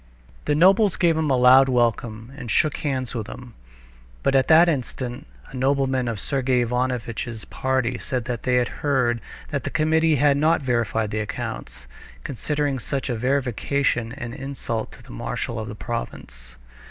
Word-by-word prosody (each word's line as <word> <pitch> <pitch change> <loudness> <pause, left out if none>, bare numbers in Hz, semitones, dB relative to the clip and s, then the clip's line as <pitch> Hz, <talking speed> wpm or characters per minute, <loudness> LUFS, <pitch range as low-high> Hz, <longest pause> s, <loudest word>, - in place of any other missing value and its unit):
The 145 - +2
nobles 195 +4 +5
gave 170 -3 +3
him 155 -1 0
a 130 - +3
loud 130 +2 +7
welcome, 120 -1 0
and 130 -5 -8
shook 150 +5 +2
hands 130 -5 -2
with 115 -3 -4
him. 125 -1 -10 0.7
But - - +2
at 135 -1 +3
that 165 +2 +7
instant 130 -2 -3 0.2
a - - -9
nobleman 130 -1 +1
of 115 -3 -3
Sergey 130 0 +1
Ivanovitch's 120 -2 -2
party 130 -2 -1
said 125 -3 -3
that 120 -3 -4
he 125 -1 +2
had 125 -1 +3
heard 125 -5 +1 0.3
that 140 -3 -2
the - - -3
committee 160 0 +2
had 145 0 +3
not 155 +3 +3
verified 115 -4 0
the 110 - -1
accounts, 105 -10 -5 0.4
considering 145 +1 -2
such 135 +1 -3
a - - -1
verification 125 0 0
an 120 -4 -6
insult 130 -5 -4
to - - -15
the - - -14
marshal 110 - -4
of 110 - -5
the 105 - -7
province. 60 - -6
130 Hz, 165 wpm, -23 LUFS, 120-140 Hz, 0.7 s, loud